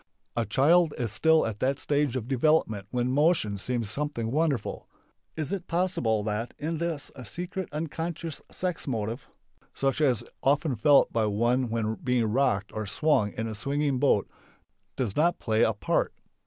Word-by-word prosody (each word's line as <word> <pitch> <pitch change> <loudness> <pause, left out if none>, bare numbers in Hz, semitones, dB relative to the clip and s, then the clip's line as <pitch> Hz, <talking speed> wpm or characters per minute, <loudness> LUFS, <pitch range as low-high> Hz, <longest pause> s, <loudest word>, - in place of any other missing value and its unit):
A 115 -3 0
child 155 - +4
is 115 -4 -2
still 160 +9 +4
at 105 -2 -4
that 135 +1 +1
stage 145 -3 0
of 120 -3 -3
development 130 -7 +2
when 125 0 0
motion 140 - +2
seems 120 +1 -2
something 130 -5 -2
wonderful. 150 -2 -1 0.5
Is 155 +2 -3
it 185 -3 -4
possible 165 - 0
that 110 +3 -3
in 160 +2 -3
this 165 -3 -3
a 130 - -9
secret 180 - -5
(unconscious) 165 +1 -4
sex 180 -4 -3
motive, 115 0 -3 0.5
such 135 +2 0
as 125 -6 +2
is - - -17
often 145 0 +2
felt 140 +6 +4
by 110 -2 +2
one 120 +4 +1
when 110 -1 -1
being 125 -3 +2
rocked 105 -4 +1
or 110 -1 -4
swung 110 -4 +1
in 110 - -3
a 110 - -4
swinging 140 +4 -1
boat, 130 -7 +3 0.7
does 115 -7 -2
not 170 +3 +3
play 110 -1 0
a - - +5
part? 100 - 0
130 Hz, 170 wpm, -27 LUFS, 110-155 Hz, 0.7 s, a